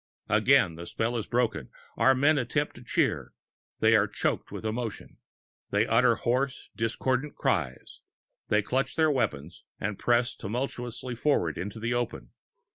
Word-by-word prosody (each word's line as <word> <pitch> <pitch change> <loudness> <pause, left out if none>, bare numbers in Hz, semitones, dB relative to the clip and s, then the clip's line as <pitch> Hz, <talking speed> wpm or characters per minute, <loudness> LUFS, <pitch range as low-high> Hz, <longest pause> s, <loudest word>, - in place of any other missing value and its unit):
Again 85 - +4
the 85 +1 -8
spell 115 +2 -1
is 110 -3 -3
broken; 120 -1 0 0.3
our 130 - +4
men 145 +3 +4
attempt 145 +4 -1
to 120 - -12
cheer; - - 0 0.5
they - - +5
are - - +4
choking - - -1
with - - -7
emotion; 110 0 -4 0.5
they 105 +2 +2
utter 120 +1 +4
hoarse, 130 +4 -1
discordant 125 +5 -1
cries; 65 +1 -2 0.5
they 105 0 +2
clutch 130 +5 -1
their 160 -1 +3
weapons 80 - -2 0.2
and 105 -1 -3
press 120 0 +2
tumultuously 120 +2 -4
forward 115 - +1
into 100 +5 -5
the 115 +2 -1
open. 120 - -3
120 Hz, 145 wpm, -28 LUFS, 105-130 Hz, 0.5 s, they